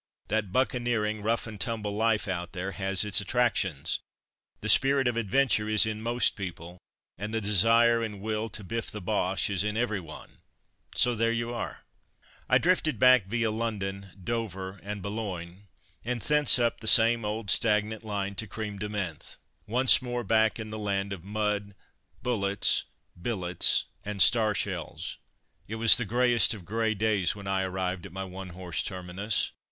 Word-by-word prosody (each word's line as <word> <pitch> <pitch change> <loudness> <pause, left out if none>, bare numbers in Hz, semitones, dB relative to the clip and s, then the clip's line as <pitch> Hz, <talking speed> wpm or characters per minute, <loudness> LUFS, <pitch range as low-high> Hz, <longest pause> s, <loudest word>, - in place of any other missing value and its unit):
That 105 -3 -1
buccaneering, 120 -4 0
rough 115 +3 0
and 110 -4 -8
tumble 105 -1 -1
life 110 -1 +1
out 90 -2 -4
there 95 +1 -4
has 95 0 0
its 100 -3 +2
attractions. 100 - 0 0.6
The - - -4
spirit 135 0 +5
of 120 - 0
adventure 115 -1 +1
is 110 0 +6
in 110 0 -4
most 120 +2 +1
people, 90 -2 -7 0.4
and 105 +2 -4
the 110 - -1
desire 115 +3 +4
and 105 -3 -4
will 110 +2 -3
to 105 0 -7
biff 115 +4 -4
the 105 - -6
Boches 95 0 -1
is - - +2
in 105 +1 -2
every 115 -4 0
one, 80 -3 -12 0.6
so 125 - +3
there 115 0 +1
you 115 +1 -2
are. 120 - -6 0.7
I - - +6
drifted 160 -6 +1
back 125 -4 +5
via 115 +1 0
London, 100 -3 -3 0.2
Dover 95 -4 -4
and 100 -1 -6
Boulogne, 100 -3 -6 0.4
and 120 +1 -2
thence 150 +3 +5
up 120 -2 0
the 110 - -7
same 115 +1 +5
old 105 -1 -2
stagnant 105 0 +2
line 100 -2 -3
to 110 - -2
Crême 105 -1 -6
de 105 +1 -4
Menthe. 95 -7 -5 0.3
Once 125 +5 +4
more 120 -1 -3
back 110 0 +2
in 110 -1 -6
the 110 - -5
land 100 -1 -2
of 90 -4 -9
mud, 105 0 -2 0.5
bullets, 100 -5 +1 0.4
billets, 90 -4 +1 0.2
and 105 -2 -5
star 110 0 +5
shells. - - -4 0.5
It 110 - -5
was 115 0 +7
the 120 - -1
greyest 120 +1 +3
of 95 -5 -12
grey 110 +2 -1
days 105 -3 +1
when 100 -1 -10
I 95 -1 0
arrived 95 -1 -3
at - - -16
my 95 +2 -5
one 95 0 -8
horse 90 -3 -2
terminus. 95 +2 -2
105 Hz, 170 wpm, -28 LUFS, 95-115 Hz, 0.7 s, was